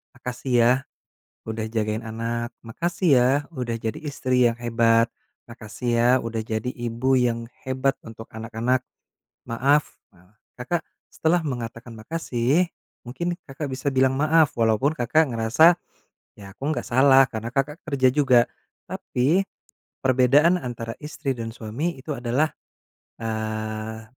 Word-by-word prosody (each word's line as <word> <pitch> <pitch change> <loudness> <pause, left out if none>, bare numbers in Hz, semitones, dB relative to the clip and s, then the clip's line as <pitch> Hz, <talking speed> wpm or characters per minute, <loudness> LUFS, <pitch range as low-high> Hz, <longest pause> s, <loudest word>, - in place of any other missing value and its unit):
"Makasih 125 +1 -5
ya, 120 - +5 0.8
udah 110 0 -3
jagain 110 -1 -1
anak. 115 +1 -3
Makasih 170 - -2
ya, 125 +1 +4 0.2
udah 125 -5 -3
jadi 110 -1 -4
istri 130 -5 +1
yang 115 - -2
hebat. 115 0 +2 0.3
Makasih 115 +1 -7
ya, 120 +1 +3 0.2
udah 115 -1 -3
jadi 110 +3 -3
ibu 120 +2 -1
yang 115 -1 0 0.2
hebat 130 +1 +1
untuk 115 0 -10
anak-anak. 115 +3 -1 0.7
Maaf." 140 +5 +1 0.2
Nah, 90 +5 -25 0.2
Kakak, 160 +7 -2 0.2
setelah 165 +1 +1
mengatakan 120 -3 -5
makasih 150 +4 0 0.3
mungkin 155 +9 -3
Kakak 140 +2 -6
bisa 130 +2 -2
bilang 130 0 +3
maaf 155 +2 +3
walaupun 115 +6 +2
Kakak 155 +5 +2
ngerasa, 120 +9 +5 0.6
"Ya, 100 -1 -11
aku - - -48
enggak 155 - -3
salah." 135 +2 +6
Karena 115 -2 -5
Kakak 140 +5 -2
kerja 130 -4 +2
juga. 130 -5 +5 0.4
Tapi, 145 +10 0 0.6
perbedaan 135 +7 +4
antara 115 -2 -5
istri 150 -2 -4
dan 115 -1 -5
suami 130 +11 -3
itu 150 - -9
adalah, 125 +6 0 0.7
eee, 110 0 -4
125 Hz, 130 wpm, -24 LUFS, 115-140 Hz, 0.8 s, salah